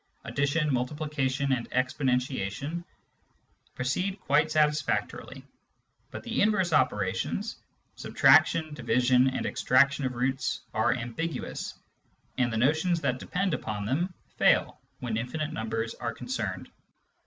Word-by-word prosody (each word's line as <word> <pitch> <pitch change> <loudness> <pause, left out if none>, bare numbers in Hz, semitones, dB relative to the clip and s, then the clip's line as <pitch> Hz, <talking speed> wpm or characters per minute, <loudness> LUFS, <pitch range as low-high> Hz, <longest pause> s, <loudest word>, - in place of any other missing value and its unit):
Addition, 145 +1 0
multiplication, 140 +1 -1
and 125 -3 -1
exponentiation 130 - -1 0.9
proceed 180 +10 -1
quite 150 -2 +3
satisfactorily, 150 -1 0 0.6
but - - -8
the 235 -1 -1
inverse 195 -5 +2
operations 105 - 0 0.2
— - - -43
subtraction, 155 -2 +4
division, 125 0 +3
and 130 - -1
extraction 140 +3 +3
of 130 -1 -2
roots 130 0 -1
— - - -37
are 110 +2 +2
ambiguous, 125 +7 -4 0.6
and 125 -2 +2
the 110 - -1
notions 160 +8 +2
that 125 -4 0
depend 185 +4 -1
upon 105 -8 -3
them 165 - 0 0.3
fail - - +3 0.2
when 115 -3 -2
infinite 150 +7 -3
numbers 115 +1 -2
are - - -4
concerned. - - -4
135 Hz, 120 wpm, -28 LUFS, 125-155 Hz, 0.9 s, subtraction